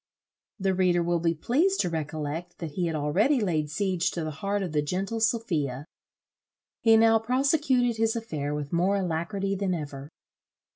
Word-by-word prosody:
The 190 0 +1
reader 180 -2 +2
will 170 0 +1
be 165 0 +1
pleased 315 - +1
to 180 - -1
recollect, 155 +2 -4
that 165 -3 -6
he 175 +3 -1
had 165 - -2
already 185 - +2
laid 160 -8 0
siege 185 +1 0
to 170 - -3
the 155 - -3
heart 200 +7 -2
of 180 - -4
the 150 -1 +1
gentle 190 +9 -2
Sophia. 165 - 0 1.0
He 225 -1 +6
now 225 0 +5
prosecuted 255 0 +1
his 225 0 +1
affair 150 -11 -3
with 145 0 -5
more 180 +4 +2
alacrity 195 +2 -1
than 190 -2 -1
ever. 145 -3 -7
180 Hz, 165 wpm, -27 LUFS, 155-225 Hz, 1.0 s, He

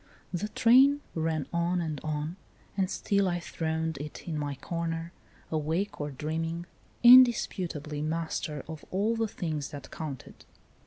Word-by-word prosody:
The 180 +4 -1
train 270 +7 +5
ran 160 -2 -1
on 170 +1 +1
and 155 -4 -3
on, 155 +2 -2 0.4
and 190 -2 +1
still 200 -1 +1
I 175 -1 0
throned 160 -2 -2
it 150 +4 -8
in 165 - -2
my 145 -2 -2
corner, 165 +3 -4 0.4
awake 160 +5 -1
or 145 - -2
dream 155 +4 -3
ing, 165 +1 -4 0.4
indisputably 185 - +5
master 155 -2 -3
of 160 -2 -8
all 210 +5 +1
the 225 0 0
things 155 -8 -3
that 145 -3 -9
counted. 145 -5 -7
165 Hz, 145 wpm, -29 LUFS, 150-185 Hz, 0.4 s, train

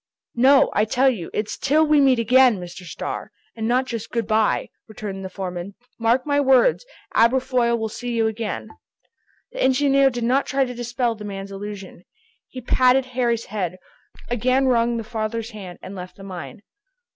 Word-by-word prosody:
"No, 265 +3 +5
I 210 - +2
tell 260 +4 +3
you, 185 -9 -6
it's 210 0 -3
till 305 +3 +3
we 300 -1 +4
meet 265 -2 +4
again, 250 0 +5
Mr. 180 0 -9
Starr, 165 - -6 0.2
and 220 -1 -3
not 250 +2 +2
Just 230 -4 -5
'good 230 -2 -2
by,'" 215 0 +1 0.2
returned 205 -3 -7
the 190 - -5
foreman. 185 0 -6 0.2
"Mark 235 +3 +2
my 285 -1 +1
words, 270 - +4 0.3
Aberfoyle 245 0 +2
will 220 -1 -2
see 240 +2 -5
you 225 -1 +2
again!" 220 0 -3 0.8
The - - -6
engineer 275 +1 +4
did 240 -2 -4
not 255 +4 +2
try 270 -1 +1
to 250 - -6
dispel 240 0 -1
the 215 -1 -10
man's 200 -1 -6
illusion. 195 -2 -8 0.4
He 255 - -9
patted 255 +2 +3
Harry's 235 -2 0
head, 185 -4 -4 0.5
again 255 +3 +1
wrung 235 -2 +2
the 225 - -3
father's 225 +1 -4
hand, 190 -5 -9
and 190 - -8
left 180 -1 -8
the 195 - -13
mine. 180 -3 -8
230 Hz, 175 wpm, -22 LUFS, 205-255 Hz, 0.8 s, No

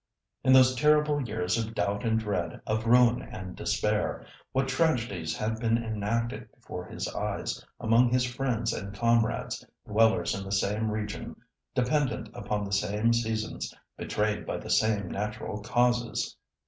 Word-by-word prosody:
In 130 - +4
those 130 0 +7
terrible 150 +2 +3
years 110 -4 -1
of 115 0 -4
doubt 100 +3 0
and 110 -1 +2
dread, 105 -2 -2
of 110 +1 -1
ruin 120 0 +5
and 95 -4 -8
despair, - - 0 0.3
what 135 +1 +1
tragedies 120 - 0
had 110 +1 -2
been 115 0 +2
enacted 115 +1 -2
before - - -7
his - - -4
eyes, - - -3 0.2
among 115 +2 +4
his 125 +1 +2
friends 125 -3 -1
and 100 0 -5
comrades, 115 +1 +1 0.2
dwellers 110 +1 +3
in 100 - -4
the 95 - -7
same 105 +2 +1
region, 105 -1 -4 0.4
dependent 125 -4 +1
upon 105 +1 -2
the 100 0 -4
same 105 +4 +2
seasons, 110 -2 -2 0.2
betrayed 105 0 -1
by - - -3
the - - -6
same 105 -3 +2
natural 105 +2 -4
causes! 120 +1 +1
110 Hz, 145 wpm, -28 LUFS, 105-120 Hz, 0.4 s, those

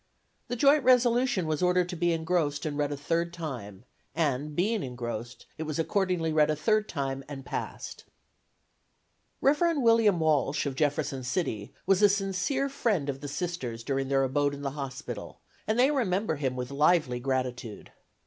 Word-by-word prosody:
The 245 - -2
joint 280 +3 +4
resolution 245 -5 +3
was 155 -1 -1
ordered 180 0 +3
to 180 - -4
be 175 +1 +1
engrossed 160 -3 0
and 150 -2 -2
read 145 0 0
a 145 - -3
third 170 +4 -1
time 125 - -7 0.3
and, 150 -2 -1
being 210 +5 +1
engrossed, 120 -2 -6
it - - -3
was 155 -1 -3
accordingly 175 -1 0
read 155 -1 +4
a 155 - +2
third 215 +7 +1
time 135 -3 -3
and 135 -2 -7
passed. - - -6 1.4
Rev. 315 +4 +3
William 230 -7 +4
Walsh, 150 -3 +1
of 140 - -2
Jefferson 145 -2 -1
City, 125 - -2
was 195 0 +3
a 205 - +7
sincere 200 +7 0
friend 215 - 0
of 135 -1 -4
the 145 - -5
Sisters 140 -7 -4
during 135 +1 -1
their 135 0 +2
abode 145 +2 +1
in 140 - -9
the 140 - -2
hospital, 135 -2 -6 0.3
and 215 +1 +1
they 260 +4 +5
remember 205 - 0
him 130 -3 -1
with 125 +1 -4
lively 145 -3 +2
gratitude. 125 -3 -3
155 Hz, 170 wpm, -28 LUFS, 135-195 Hz, 1.4 s, a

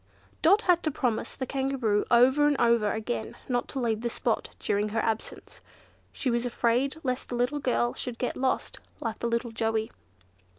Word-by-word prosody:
Dot 395 +7 +5
had 355 -2 +4
to 315 - 0
promise 245 -6 -1
the 260 - -3
Kangaroo 265 -6 0
over 260 +5 +5
and 290 -1 +1
over 235 -3 +3
again, 120 - -3
not 245 -1 0
to 270 - -4
leave 225 -3 0
the 235 - -1
spot - - -1
during 205 +1 0
her 225 +2 -1
absence. 220 0 -4 0.5
She 255 - -1
was 235 0 +1
afraid 245 +3 +1
lest 255 -1 -2
the 245 - -3
little 250 +5 0
girl 245 -3 +1
should 245 -2 -4
get 250 - -2
lost, 260 0 -1 0.2
like 225 -2 -4
the 235 - -1
little 235 0 -1
Joey. 225 -1 -1
240 Hz, 180 wpm, -28 LUFS, 225-265 Hz, 0.5 s, Dot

